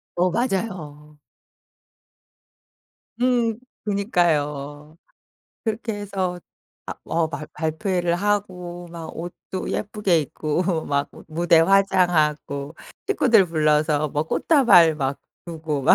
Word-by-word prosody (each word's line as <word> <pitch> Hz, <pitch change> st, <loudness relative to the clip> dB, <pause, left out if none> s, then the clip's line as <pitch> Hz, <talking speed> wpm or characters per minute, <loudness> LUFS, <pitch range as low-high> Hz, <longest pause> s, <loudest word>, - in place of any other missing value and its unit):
어 180 Hz, +1 st, +2 dB
맞아요. 170 Hz, -, -3 dB, 2.0 s
음. 240 Hz, -3 st, +1 dB, 0.2 s
그니까요. 155 Hz, -, -1 dB, 0.7 s
그렇게 220 Hz, 0 st, -2 dB
해서 190 Hz, -3 st, -3 dB, 0.5 s
아 -, -, -4 dB
어 165 Hz, -1 st, 0 dB
발 155 Hz, -2 st, -6 dB
발표회를 170 Hz, +2 st, -1 dB
하고 180 Hz, -3 st, -2 dB
막 165 Hz, -2 st, -7 dB
옷도 175 Hz, +2 st, -6 dB
예쁘게 200 Hz, -5 st, 0 dB
입고 160 Hz, +3 st, -2 dB
막 140 Hz, 0 st, 0 dB
무 -, -, -14 dB
무대 170 Hz, +1 st, +3 dB
화장하고 165 Hz, -6 st, +2 dB, 0.3 s
식구들 235 Hz, -, +4 dB
불러서 155 Hz, -2 st, +2 dB
뭐 145 Hz, +2 st, -1 dB
꽃다발 175 Hz, -, +5 dB
막 140 Hz, -2 st, -2 dB, 0.3 s
주고 160 Hz, -4 st, -3 dB
막 -, -, +6 dB
170 Hz, 200 characters per minute, -23 LUFS, 150-195 Hz, 2.0 s, 막